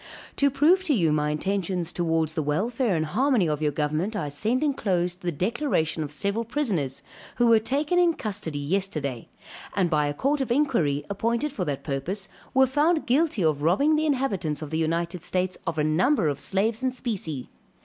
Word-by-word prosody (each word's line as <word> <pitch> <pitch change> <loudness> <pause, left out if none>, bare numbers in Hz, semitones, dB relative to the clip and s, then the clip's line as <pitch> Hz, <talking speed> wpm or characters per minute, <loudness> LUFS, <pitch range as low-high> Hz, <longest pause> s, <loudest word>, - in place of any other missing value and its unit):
To 280 - +4
prove 305 +8 +3
to 300 -6 +3
you 165 -7 +2
my 150 0 +1
intentions 180 +1 -2
towards 160 -2 0
the 160 - -1
welfare 205 - 0
and 160 -1 0
harmony 240 - +2
of 150 -1 -1
your 150 -1 +1
government 155 +8 -1
I 160 -8 -2
send 220 - 0
enclosed 180 - 0
the 175 - -1
declaration 170 - 0
of 150 - -3
several 200 +10 -1
prisoners, 210 - -2 0.3
who 240 - +2
were 230 -1 +6
taken 290 +10 0
in 345 -2 +3
custody 195 -8 -4
yesterday, 145 - -2 0.5
and 180 -3 +1
by 150 -1 +2
a 145 - -3
court 280 - 0
of 260 - -2
inquiry 230 - +1
appointed 235 +7 -1
for 185 -9 -2
that 140 -4 -3
purpose, 170 +8 -3 0.2
were 265 0 +5
found 300 +5 +2
guilty 265 - +2
of 155 -3 +1
robbing 240 - +3
the 310 +1 +1
inhabitants 195 - -1
of 150 - -8
the 160 - -1
United 170 +2 -1
States 185 +1 -1
of 165 - -2
a 150 - +2
number 170 - +2
of 145 -1 -3
slaves 215 - 0
and 260 -1 -1
specie. 180 - -4
190 Hz, 190 wpm, -25 LUFS, 155-255 Hz, 0.5 s, were